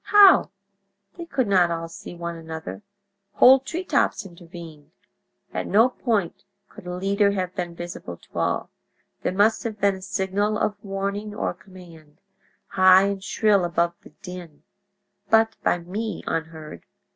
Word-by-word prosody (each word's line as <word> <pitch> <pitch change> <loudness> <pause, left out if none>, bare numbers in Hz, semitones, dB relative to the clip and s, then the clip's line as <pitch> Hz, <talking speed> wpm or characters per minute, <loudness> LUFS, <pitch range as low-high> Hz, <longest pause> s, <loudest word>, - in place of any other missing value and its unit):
How? 395 - +7 0.7
They 340 -1 -8
could 260 -7 0
not 185 -3 +4
all 165 0 -3
see 165 +1 -10
one 170 0 -5
another—whole 200 +8 +1
treetops 335 - -1
intervened. 170 -4 -12 0.6
At - - -3
no 225 +5 +5
point 220 -9 -2 0.3
could 180 - -13
a 180 - -4
leader 200 +2 +2
have 185 -2 -2
been 175 -2 -4
visible 175 - -7
to - - -23
all. - - -1 0.5
There - - -1
must 205 +4 +3
have 220 -2 -5
been 200 -1 +2
a - - -13
signal 200 +2 -1
of 205 0 -2
warning 200 +1 -4
or - - -2
command, 170 -6 -16 0.5
high 185 0 +6
and 195 -1 -4
shrill 205 -2 +2
above 170 0 0
the - - -15
din, 180 -5 -9 0.7
but 225 0 +4
by - - +2
me 205 +6 -5
unheard. 160 -1 -5
190 Hz, 145 wpm, -24 LUFS, 170-210 Hz, 0.7 s, How